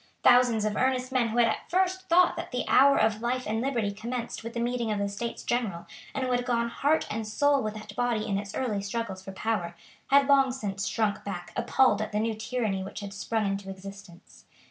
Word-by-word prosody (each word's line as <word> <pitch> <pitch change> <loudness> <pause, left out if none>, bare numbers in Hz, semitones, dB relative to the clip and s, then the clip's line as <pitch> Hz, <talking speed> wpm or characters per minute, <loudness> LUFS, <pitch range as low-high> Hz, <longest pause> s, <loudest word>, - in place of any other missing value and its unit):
Thousands 245 -3 +5
of 210 -1 -1
earnest 255 0 0
men 255 -3 +2
who 225 +1 -3
had 235 -1 +5
at - - -3
first 375 +1 0
thought 350 +1 +5
that - - -5
the 250 -1 -3
hour 275 +1 +6
of 220 0 +2
life 255 +2 -1
and 220 +1 -1
liberty 235 -6 0
commenced 235 +3 -5
with 230 +1 -7
the - - -1
meeting 240 -1 -1
of 210 - 0
the 200 0 0
States 230 +4 -5
General, 220 -9 -2 0.3
and 265 - -1
who 255 - -1
had 245 0 +1
gone 235 -1 0
heart 290 +6 +1
and 220 0 -3
soul 285 +5 +2
with 215 0 -3
that 210 -1 -9
body 240 -3 0
in 200 -2 -1
its 200 -1 -7
early 215 -6 -1
struggles 200 -2 -4
for 195 - -7
power, 190 -4 -2 0.3
had 280 0 +5
long 275 -2 +5
since 200 -6 -3
shrunk 215 -2 -1
back 185 -3 -6
appalled 250 -6 +3
at 215 - -3
the 210 - +1
new 225 +1 0
tyranny 220 -3 -2
which 195 +2 -7
had 200 -1 -7
sprung 215 +2 -1
into 195 0 -3
existence. 195 -2 -11
225 Hz, 225 wpm, -28 LUFS, 205-250 Hz, 0.3 s, hour